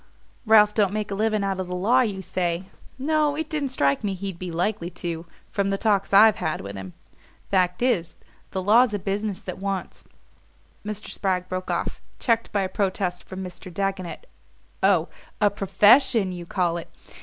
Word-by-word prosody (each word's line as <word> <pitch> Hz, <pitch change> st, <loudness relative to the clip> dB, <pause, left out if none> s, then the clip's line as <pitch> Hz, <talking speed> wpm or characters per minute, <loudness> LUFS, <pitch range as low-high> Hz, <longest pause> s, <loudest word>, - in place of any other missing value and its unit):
"Ralph 210 Hz, -1 st, +6 dB
don't 205 Hz, -3 st, +2 dB
make 210 Hz, -1 st, -3 dB
a -, -, 0 dB
living 215 Hz, 0 st, +1 dB
out 195 Hz, -1 st, -1 dB
of 185 Hz, -, -3 dB
the 180 Hz, -, -4 dB
law, 230 Hz, +8 st, +3 dB
you 200 Hz, -6 st, -2 dB
say? 175 Hz, -1 st, -1 dB, 0.3 s
No, 300 Hz, +1 st, +1 dB
it 315 Hz, +1 st, -4 dB
didn't 295 Hz, -3 st, -1 dB
strike 140 Hz, -, +1 dB
me 200 Hz, -2 st, -1 dB
he'd 190 Hz, -2 st, -6 dB
be 185 Hz, -, -5 dB
likely 175 Hz, +1 st, -1 dB
to, 170 Hz, -1 st, -5 dB, 0.2 s
from 200 Hz, -2 st, 0 dB
the 195 Hz, -, 0 dB
talks 200 Hz, -2 st, +1 dB
I've 210 Hz, +2 st, +7 dB
had 155 Hz, -, -2 dB
with 100 Hz, +1 st, -7 dB
him. 95 Hz, -2 st, -8 dB, 0.6 s
Fact 180 Hz, +2 st, +2 dB
is, 215 Hz, -10 st, +1 dB, 0.3 s
the 190 Hz, -, -3 dB
law's 220 Hz, +3 st, +5 dB
a -, -, 0 dB
business 200 Hz, +1 st, -3 dB
that 185 Hz, 0 st, -7 dB
wants 195 Hz, -1 st, -4 dB, 0.4 s
" -, -, -35 dB
Mr. 210 Hz, 0 st, -5 dB
Spragg 185 Hz, -2 st, -1 dB
broke 185 Hz, 0 st, -4 dB
off, -, -, -2 dB, 0.2 s
checked 230 Hz, -2 st, +1 dB
by 200 Hz, -2 st, +1 dB
a -, -, 0 dB
protest 185 Hz, -2 st, -2 dB
from 190 Hz, 0 st, -7 dB
Mr. 180 Hz, 0 st, -9 dB
Dagonet. 195 Hz, -, -3 dB, 0.6 s
"Oh, -, -, +3 dB, 0.3 s
a 205 Hz, -1 st, +4 dB
PROFESSION, 205 Hz, +3 st, +4 dB
you 175 Hz, -1 st, -7 dB
call 175 Hz, -2 st, 0 dB
it? 170 Hz, -, -8 dB
195 Hz, 185 wpm, -24 LUFS, 180-215 Hz, 0.6 s, I've